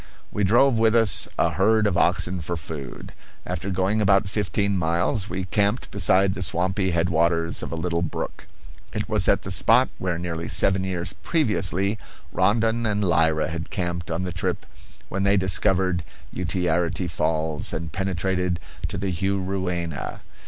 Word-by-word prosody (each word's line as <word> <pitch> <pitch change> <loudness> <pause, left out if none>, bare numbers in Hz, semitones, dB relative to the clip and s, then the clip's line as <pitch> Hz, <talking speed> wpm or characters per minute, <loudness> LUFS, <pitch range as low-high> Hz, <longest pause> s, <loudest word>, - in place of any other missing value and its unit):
We 105 - -1
drove 120 +5 +4
with 110 0 +4
us 115 -7 +3
a 85 - +2
herd 105 +6 +3
of 100 - +1
oxen 90 +1 +1
for 85 +2 -3
food. 75 -5 -8 0.3
After 90 +2 -4
going 95 +3 +1
about 100 -1 +3
fifteen 100 0 -1
miles 90 +4 0
we 90 +1 -3
camped 100 +5 0
beside 95 0 +3
the 95 - -6
swampy 95 +2 0
headwaters 85 -1 +1
of - - -5
a - - -2
little 85 0 -1
brook. 85 - -4 0.5
It - - -2
was - - +1
at - - +3
the - - -4
spot - - +4
where 90 -2 -1
nearly 85 -1 -4
seven 95 0 +2
years 90 -2 -2
previously 105 - 0 0.3
Rondon 115 +4 +2
and 105 -1 0
Lyra 80 -4 +2
had 80 0 -5
camped 85 -1 -3
on 85 +2 -2
the 90 -1 -4
trip 85 - -2 0.4
when 100 - -3
they 100 +1 +3
discovered 95 -1 +1 0.3
Utiarity 90 +1 0
Falls 80 -2 -1
and 80 0 -4
penetrated 90 -1 -1 0.3
to - - -5
the 95 0 -2
Juruena. 95 -3 -2
95 Hz, 155 wpm, -24 LUFS, 85-100 Hz, 0.5 s, drove